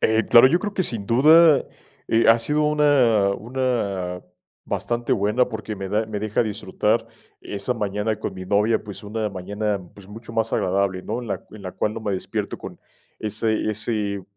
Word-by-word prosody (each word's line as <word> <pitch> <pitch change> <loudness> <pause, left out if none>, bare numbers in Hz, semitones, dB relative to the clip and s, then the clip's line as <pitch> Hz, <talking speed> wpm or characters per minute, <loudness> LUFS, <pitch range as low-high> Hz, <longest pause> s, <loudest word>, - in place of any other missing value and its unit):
Eh, 110 +1 +2
claro, 120 +2 +8
yo 170 - +3
creo 205 +1 -4
que 190 - +1
sin 110 - -3
duda, 155 +5 +6 0.4
eh, 115 +1 +3
ha 115 - +7
sido 150 +6 0
una 140 -9 +3
una 105 -7 -2 0.4
bastante 120 0 -2
buena 105 +5 +2
porque 110 -2 -5
me 95 0 -5
da 110 +3 0
me 105 -2 -4
deja 110 +2 0
disfrutar 105 -2 -1 0.3
esa 100 +5 -3
mañana 105 -1 -2
con 110 - -5
mi 95 - -7
novia, 105 +4 +2
pues 105 -2 -9
una 105 +1 -2
mañana, 100 +2 -3
pues 100 -2 -15
mucho 115 +2 -10
más 115 0 -1
agradable, 95 0 0
¿no? 115 +5 -3
En 115 - -8
la - - -4
en 105 -2 -12
la 90 - -6
cual 105 - -2
no 115 - -5
me 105 -2 -2
despierto 95 - -4
con - - -9 0.4
ese 110 0 -1
ese 105 -2 -2
110 Hz, 185 wpm, -23 LUFS, 100-120 Hz, 0.4 s, claro